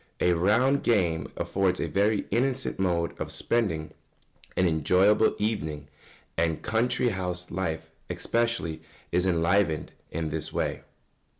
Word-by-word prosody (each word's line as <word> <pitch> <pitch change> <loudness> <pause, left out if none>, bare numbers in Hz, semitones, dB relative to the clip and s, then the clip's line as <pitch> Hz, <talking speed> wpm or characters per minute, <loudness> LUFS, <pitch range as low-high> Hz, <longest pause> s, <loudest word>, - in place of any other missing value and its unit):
] - - -42
A - - +4
round 115 +11 +3
game 85 -9 +1
affords 95 -2 0
a - - -1
very 105 +1 +1
innocent 130 +2 0
mode 85 -3 +1
of - - -3
spending 90 -10 -1 0.6
an 90 - +4
enjoyable 90 +7 +3
evening, 80 -9 -2 0.5
and 80 -1 0
country 120 +3 +1
house 90 -3 -4
life 85 -3 -3 0.2
especially 115 -9 -1 0.3
is 90 +2 +2
often 90 - +2
enlivened 85 -1 +1 0.2
in 80 -1 -3
this 80 0 -3
way. - - -2
95 Hz, 130 wpm, -27 LUFS, 80-110 Hz, 0.6 s, A